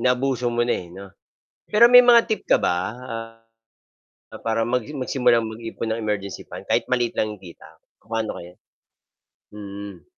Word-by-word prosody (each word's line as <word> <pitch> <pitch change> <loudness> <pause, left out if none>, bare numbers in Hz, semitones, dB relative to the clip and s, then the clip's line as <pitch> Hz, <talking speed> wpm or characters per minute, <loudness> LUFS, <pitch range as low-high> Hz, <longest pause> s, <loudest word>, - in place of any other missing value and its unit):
Naabuso 125 -1 +1
mo 120 0 0
na, 120 - +1
eh, 85 - -14
'no. 95 +3 -11 0.6
Pero 220 +3 +7
may 245 +1 +9
mga 240 -1 +6
tip 220 - -2
ka - - +6
ba, - - +1 0.2
ah, 115 -2 -8 0.9
na - - -8
para 115 0 -1
mag 125 +1 0 0.2
magsimulang 125 -3 +2
mag-ipon 115 0 -5
ng 110 - -2
emergency 105 -3 -3
fund. - - -9
Kahit - - +1
maliit 120 -2 0
lang 110 -1 -1
yong 95 - -22
kita. 85 -2 -13 0.3
Paano 110 0 -4
kaya? 90 +1 -12 1.0
Mm. 100 -3 -9
115 Hz, 165 wpm, -23 LUFS, 105-125 Hz, 1.0 s, may